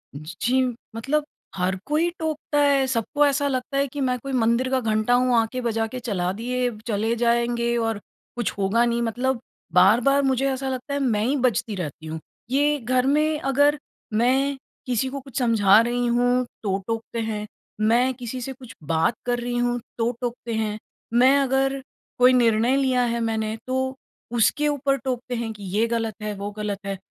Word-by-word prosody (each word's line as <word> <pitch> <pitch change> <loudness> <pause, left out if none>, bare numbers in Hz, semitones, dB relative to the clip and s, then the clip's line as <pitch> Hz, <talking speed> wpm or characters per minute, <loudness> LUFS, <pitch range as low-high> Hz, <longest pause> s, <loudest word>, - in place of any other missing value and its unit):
ज 155 +5 -8
जी, 255 +3 +3 0.3
मतलब 290 +6 0 0.3
हर 185 0 0
कोई 315 +4 +1
टोकता 310 -2 -1
है, 280 -2 +4
सबको 260 +4 +1
ऐसा 285 0 +2
लगता 265 +1 -2
है 280 - +2
कि 280 +2 -6
मैं 255 -1 +1
कोई 275 +2 -6
मंदिर 240 +1 +2
का 260 0 +2
घंटा 220 0 +1
हूँ 250 0 +3
आके 230 +3 0
बजा 225 -2 0
के 255 +3 -6
चला 185 -6 -1
दिए, 245 +4 -1 0.2
चले 220 +1 0
जाएँगे 235 0 +1
और 225 -2 -2 0.4
कुछ 240 -3 -1
होगा 200 +4 +2
नहीं 235 0 0
मतलब 245 +2 -1 0.3
बार-बार 235 +10 +5
मुझे 270 0 +1
ऐसा 265 0 -3
लगता 260 +2 -4
है, 285 - 0
मैं 225 -6 +1
ही 275 +4 +1
बजती 235 -2 -2
रहती 160 -3 -6
हूँ। 160 0 -5 0.3
ये 290 +2 +2
घर 255 +1 +1
में 305 +2 +2
अगर 285 +2 +3 0.4
मैं 265 +5 +2 0.3
किसी 250 +1 0
को 275 +1 -5
कुछ 270 -2 -10
समझा 215 -4 +5
रही 240 +1 0
हूँ, 245 +1 +2 0.2
तो 195 -2 0
टोकते 225 0 -3
हैं, 215 -2 -3 0.4
मैं 240 +4 +3
किसी 250 0 -6
से 265 +2 -4
कुछ 250 -2 -12
बात 160 +8 +1
कर 245 0 0
रही 240 0 -2
हूँ, 245 0 +1 0.2
तो 230 +1 +1
टोकते 240 -1 -4
हैं। 215 -1 -1 0.4
मैं 260 +3 +6
अगर 270 0 +1 0.4
कोई 250 +1 +6
निर्णय 235 +1 +3
लिया 260 -2 +2
है 235 0 -1
मैंने 220 -1 -1
तो 260 +1 -1 0.4
उसके 245 +6 +3
ऊपर 280 -1 +1
टोकते 250 -1 -3
हैं 230 -1 -3
कि 205 -2 -12
ये 225 - +4
ग़लत 230 -2 -1
है, 210 0 -3
वो 200 +1 -5
ग़लत 205 -1 -4
है। 195 -1 -3
245 Hz, 185 wpm, -24 LUFS, 225-265 Hz, 0.4 s, मैं